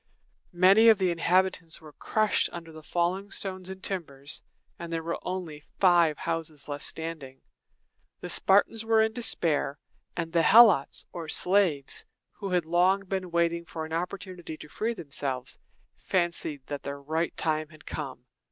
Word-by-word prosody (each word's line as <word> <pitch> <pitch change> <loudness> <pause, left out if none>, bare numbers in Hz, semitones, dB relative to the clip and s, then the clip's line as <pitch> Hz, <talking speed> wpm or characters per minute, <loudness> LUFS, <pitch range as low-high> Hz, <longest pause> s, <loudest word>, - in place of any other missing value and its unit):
Many 195 +6 +7
of 220 - +7
the 185 -2 +1
inhabitants 175 -1 +1
were 155 -2 -14
crushed 215 +6 +1
under 170 -1 -8
the 155 0 -11
falling 180 +5 -1
stones 190 -2 -4
and 190 0 -8
timbers, 145 -7 -4 0.4
and 170 0 -7
there 165 -1 -2
were 170 +1 -3
only 180 -5 -5 0.2
five 175 -5 +5
houses 160 -3 -4
left 145 -1 -5
standing. 155 -5 -5 0.8
The - - -7
Spartans 205 +3 +3
were 225 -1 +4
in 220 0 0
despair; 165 - 0 0.4
and 165 -1 -3
the 170 - +4
Helots, 195 -4 +6
or 165 -3 -6
slaves, 180 -9 +2 0.3
who 200 - -6
had 180 -3 +1
long 180 +4 +3
been 185 -1 -3
waiting 170 0 +1
for 160 -1 -6
an 160 - -8
opportunity 180 -1 -5
to 150 - -11
free 225 +9 -2
themselves, 140 - -3 0.4
fancied 170 -6 -1
that 145 -1 -5
the 140 - -5
right 155 +4 -2
time 155 -1 0
had 155 -1 -17
come. 130 -5 -6
170 Hz, 155 wpm, -28 LUFS, 155-190 Hz, 0.8 s, Many